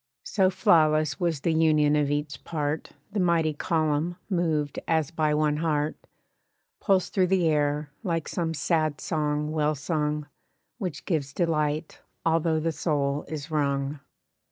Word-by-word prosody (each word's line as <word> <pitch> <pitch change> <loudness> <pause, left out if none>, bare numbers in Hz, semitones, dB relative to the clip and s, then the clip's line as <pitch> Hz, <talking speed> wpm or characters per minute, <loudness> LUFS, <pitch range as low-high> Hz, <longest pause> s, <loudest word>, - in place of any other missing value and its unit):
So 190 -3 +2
flawless 155 -5 +3
was 170 -5 0
the 165 - +1
union 155 -2 +4
of 145 -1 +2
each 145 0 -3
part 150 -1 -2 0.2
The 210 - -2
mighty 170 -3 +2
column 155 +2 0 0.2
(moved 160 -5 0
as 160 -1 +1
by 155 -3 +1
one 150 -1 +2
heart) 155 -1 0 0.8
Pulsed 190 -3 +1
through 185 -2 +3
the 180 -2 +2
air, 150 -1 +1
like 165 -7 -2
some 165 -2 -2
sad 155 0 0
song 150 -1 -1
well 155 -1 +1
sung, 150 0 -1 0.5
Which 180 -9 -4
gives 145 -6 -1
delight, 155 -2 0 0.3
although 165 -1 +2
the 165 +1 0
soul 145 -3 -1
is 155 0 -6
wrung. 140 -1 0
155 Hz, 140 wpm, -26 LUFS, 150-165 Hz, 0.8 s, union